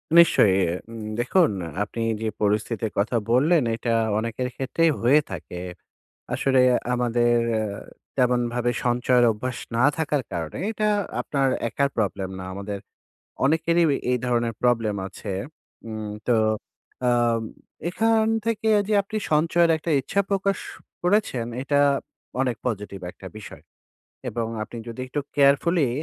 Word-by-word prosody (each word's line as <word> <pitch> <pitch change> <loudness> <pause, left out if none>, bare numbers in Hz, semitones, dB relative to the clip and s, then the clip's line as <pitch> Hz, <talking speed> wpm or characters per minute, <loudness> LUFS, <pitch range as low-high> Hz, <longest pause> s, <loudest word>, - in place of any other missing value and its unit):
নিশ্চয়ই। 160 - +6
এ - - +3
এ - - -2 0.2
উম 115 -1 -7 0.2
দেখুন 160 - +3
এ - - -6 0.2
আপনি 115 +3 -6 0.2
যে 110 - -1
পরিস্থিতির 105 +1 0
কথা 110 +4 +1 0.2
বললেন 150 +4 +4
এটা 115 0 -1 0.3
অনেকের 115 +3 -3
ক্ষেত্রেই 160 +5 +1
হয়ে 140 +6 +5
থাকে। 90 0 -6 0.7
আসলে 135 -1 +2 0.3
আমাদের 120 -1 +2 0.3
আ - - -1 0.5
তেমনভাবে 120 -1 +1
সঞ্চয়ের 120 0 +3
অভ্যাস 125 +4 -4 0.2
না 125 - +3
থাকার 150 -4 0
কারণে 80 -2 -4
এটা 215 -1 0 0.3
আপনার 135 -2 0 0.2
একার 140 +3 +1
প্রবলেম 95 -3 -1
না। - - -6
আমাদের 100 0 -5 0.7
অনেকেরই 170 +3 +3
অ - - +3 0.2
এই 125 - +3
ধরনের 120 -1 +1
প্রবলেম 115 -4 +2
আছে। 100 +1 -7 0.6
উম 110 -1 -5 0.2
তো 120 - +4 0.7
আ - - +5 0.8
এখান 225 +3 +2 0.2
থেকে 220 -1 0 0.2
যে 215 - +1
আপনি 215 +2 -5
সঞ্চয়ের 165 +2 +4
একটা 160 +1 -3
ইচ্ছা 200 +9 0
প্রকাশ 195 0 +1 0.5
করেছেন, 180 - +1 0.2
এটা 145 +1 +1 0.6
অনেক 125 -3 0
পজিটিভ 105 -4 -3
একটা 95 - -11
বিষয়। - - -11 0.7
এবং 115 -2 -2 0.2
আপনি 115 - -9
যদি 115 +2 -7
একটু 145 +3 -2 0.2
কেয়ারফুলি 145 +2 +4
125 Hz, 135 wpm, -24 LUFS, 115-155 Hz, 0.8 s, নিশ্চয়ই